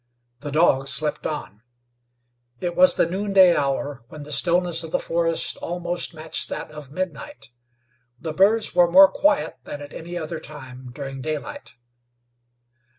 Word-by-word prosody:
The 145 - -6
dog 140 -3 +3
slept 150 +2 -2
on. 110 -9 -6 1.0
It 175 -1 -3
was 185 0 +6
the - - +3
noonday 190 0 +4
hour, 140 -1 -1
when 150 +2 -10
the 150 - -10
stillness 175 +1 +2
of 160 - -7
the - - +1
forest 165 0 -1
almost 175 0 -4
matched 155 0 -3
that - - -6
of 150 -3 -10
midnight. 155 -9 -6 0.7
The 160 -1 -5
birds 205 +6 +3
were 175 -1 +5
more 190 +2 +9
quiet 295 - +1
than 145 - -7
at 145 0 -10
any 175 +2 -7
other 160 0 -5
time 130 -4 -10
during 135 0 -7
daylight. 155 +1 -6
160 Hz, 150 wpm, -23 LUFS, 145-175 Hz, 1.0 s, more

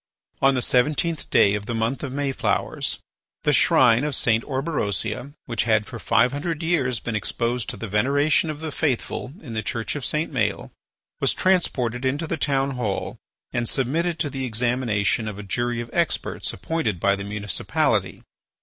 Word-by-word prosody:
On 135 0 +5
the 125 - +1
seventeenth 150 +5 +1
day 100 - +5
of 105 0 -3
the 120 - -2
month 115 +4 -1
of 140 - -4
Mayflowers, 140 0 -1 0.5
the - - +3
shrine 120 0 +5
of 150 -3 0
St. 115 -2 +2
Orberosia, 130 - -2
which 115 -2 -1
had 110 -2 +3
for 120 - -8
five 125 +2 +3
hundred 155 +3 -3
years 135 -8 +1
been 115 -1 -4
exposed 115 +3 -1
to 125 - -5
the 115 - -5
veneration 145 - +2
of 155 0 -5
the 160 -1 -4
faithful 130 -3 -1
in 125 -7 -8
the 110 - -1
Church 115 +3 -2
of 145 - -4
St. 155 +4 0
Maël, 105 -6 -1 0.5
was - - +2
transported 130 -10 +1
into 140 +5 0
the - - -2
town 140 -2 +1
hall 115 -7 -3 0.3
and 120 -1 0
submitted 165 +6 0
to 145 - -1
the 135 0 -4
examination 115 -3 0
of 105 -2 -5
a 105 - -7
jury 120 +4 -1
of 115 - -8
experts 170 -1 0
appointed 135 - -2
by 100 +3 +3
the 100 - -5
municipality. 100 -1 -1
125 Hz, 175 wpm, -24 LUFS, 110-145 Hz, 0.5 s, On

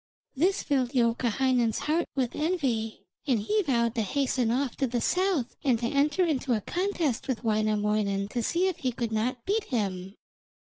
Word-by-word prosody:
This 370 +8 +1
filled 260 -4 0
Youkahainen's 240 0 +2
heart 325 +3 0
with 255 -4 -1
envy, 270 -10 -1 0.2
and 250 -5 +3
he 420 - +1
vowed 235 - +1
to 230 - 0
hasten 255 +1 0
off 255 +1 0
to 270 - +1
the 240 0 -1
south 360 -4 0
and 255 -4 +3
to 235 - -3
enter 290 +7 +2
into 275 -5 0
a 215 - 0
contest 345 - -1
with 260 -4 -2
Wainamoinen 210 -2 +1
to 240 - -2
see 345 - +1
if 370 -3 -2
he 260 -7 -1
could 235 -1 -3
not 235 +3 -1
beat 425 +2 0
him. 195 -5 -3
250 Hz, 175 wpm, -28 LUFS, 225-295 Hz, 0.2 s, and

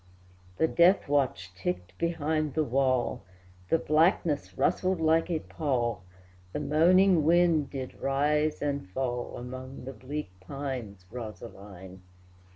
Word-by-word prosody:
The 160 - +3
death 175 +4 +4
watch 130 -11 0
ticked 90 0 -4
behind 155 -3 -1
the 155 - +2
wall, 130 -1 +1 0.5
The - - +4
blackness 160 -1 +1
rustled 185 -1 +1
like 160 +1 +2
a 170 - +1
pall, 120 - -1 0.5
The - - -2
moaning 175 +3 +4
wind 165 -2 +3
did 130 -2 -6
rise 150 +3 +1
and 140 -9 -2
fall 125 +2 -3
Among 130 +1 -8
the 135 - -6
bleak 130 -1 -6
pines, 120 -4 -6
Rosaline! 100 -5 -9
140 Hz, 120 wpm, -28 LUFS, 120-155 Hz, 0.5 s, death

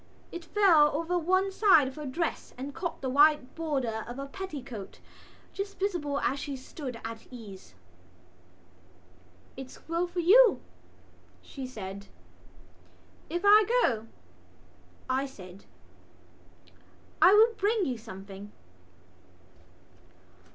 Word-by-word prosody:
It 345 - -7
fell 335 -5 +5
over 335 +3 -1
one 375 +3 +1
side 380 -9 +5
of 265 - -6
her 300 -2 -6
dress 325 +6 -3
and 275 +3 -6
caught 345 +2 -5
the 265 - -2
white 290 -1 +4
border 265 -9 -2
of 240 +2 -7
a 275 - -5
petticoat, 275 - -8 0.5
just 395 0 -5
visible 335 -8 -1
as 275 - 0
she 280 -1 -5
stood 260 -2 -8
at 225 0 -8
ease. 200 - -12 1.8
"It's 265 0 -11
well 335 +2 0
for 350 0 -5
you," 445 +7 +6 0.8
she 265 -2 -7
said. 200 -4 -8 1.2
"If 345 +2 -3
I 420 +1 +8 0.2
go," 225 -3 0 1.0
I 265 +2 0
said, 190 -7 -13 1.6
"I 370 - +8
will 450 +2 +6
bring 415 -1 0
you 250 -5 -3
something." 200 -1 -10
285 Hz, 115 wpm, -29 LUFS, 240-355 Hz, 1.8 s, I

